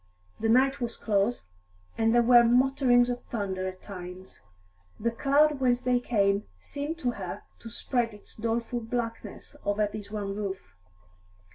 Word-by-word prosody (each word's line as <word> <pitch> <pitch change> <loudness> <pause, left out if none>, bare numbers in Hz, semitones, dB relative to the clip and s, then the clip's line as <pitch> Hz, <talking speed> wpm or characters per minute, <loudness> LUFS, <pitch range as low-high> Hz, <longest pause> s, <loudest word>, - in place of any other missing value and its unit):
The 225 - 0
night 265 +3 +4
was 235 -1 -3
close, 210 - 0 0.5
and 225 0 +2
there 240 0 +5
were 240 0 +7
mutterings 245 0 +4
of 245 0 -3
thunder 190 -4 -3
at 185 0 -8
times; 185 -1 -9 0.6
the 235 +2 0
cloud 285 +4 +3
whence 250 -1 +2
they 250 -1 +3
came 200 -4 +1
seemed 290 - -5
to 255 -7 0
her 190 -6 -6 0.2
to 230 - -9
spread 235 0 -1
its 210 -1 -12
doleful 230 +2 -2
blackness 230 -2 -5
over 205 +1 +1
this 205 0 -7
one 205 -2 -3
roof. 195 - -5
230 Hz, 150 wpm, -28 LUFS, 205-245 Hz, 0.6 s, were